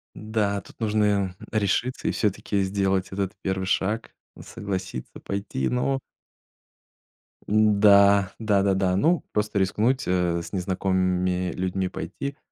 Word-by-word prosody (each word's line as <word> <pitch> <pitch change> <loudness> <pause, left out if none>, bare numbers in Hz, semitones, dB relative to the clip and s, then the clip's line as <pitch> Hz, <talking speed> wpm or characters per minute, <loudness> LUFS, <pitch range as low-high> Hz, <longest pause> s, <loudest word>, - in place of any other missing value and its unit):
Да, 105 -2 -1
тут - - -18
нужно, 110 -1 +1
м, 100 -3 +1 0.2
решиться 110 +4 0
и - - +2
всё-таки 100 -1 0
сделать 95 -1 0
этот 95 -1 -2
первый 95 0 -2
шаг, 105 +4 -1 0.3
согласиться, 95 -9 -6
пойти, 100 -9 -2
ну 135 +2 0 1.5
Да, 100 -2 +5
да-да-да. 100 -3 +2
Ну, 165 - +2
просто 105 -1 0
рискнуть, 110 +7 +1
э, 90 -2 +1
с - - -11
незнакомыми 90 -1 0
людьми 95 0 -2
пойти. 140 +8 -5
100 Hz, 115 wpm, -25 LUFS, 95-105 Hz, 1.5 s, Да